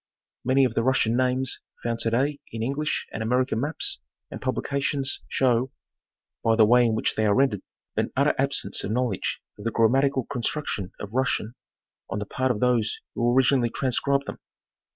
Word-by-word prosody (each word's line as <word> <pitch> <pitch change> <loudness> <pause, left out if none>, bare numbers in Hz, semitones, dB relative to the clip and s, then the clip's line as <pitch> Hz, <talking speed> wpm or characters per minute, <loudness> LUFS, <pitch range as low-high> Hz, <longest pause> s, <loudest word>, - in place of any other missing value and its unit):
Many 135 +1 +4
of 125 - -1
the 115 - +1
Russian 120 -2 +2
names 130 +1 0 0.2
found 115 -1 -1
to 115 - +1
day 140 +5 0
in 110 0 -4
English 140 +5 -1
and - - -4
American 125 +1 +1
maps 150 +4 -1 0.3
and - - -7
publica 140 +2 -1
tions 140 -1 -1
show, 130 0 +2 0.7
by 115 0 +3
the 110 -1 +6
way 120 +2 +5
in 110 - +1
which - - 0
they 110 0 +1
are 100 - +3
rendered, 130 -8 +2 0.3
an - - 0
utter. 140 +3 +3
absence 135 -7 0
of - - -3
knowledge 120 -3 -1 0.2
of - - -8
the 115 - 0
grammatical 130 +4 +2
construction 120 -6 -3
of 105 +1 -7
Russian 125 -3 0 0.6
on 95 - -3
the 105 - -3
part 130 +5 -1
of 115 -4 0
those 120 -4 +2
who 120 +1 +1
originally 130 -2 +4
transcribed 140 +3 0
them. - - -7
125 Hz, 180 wpm, -25 LUFS, 115-135 Hz, 0.7 s, the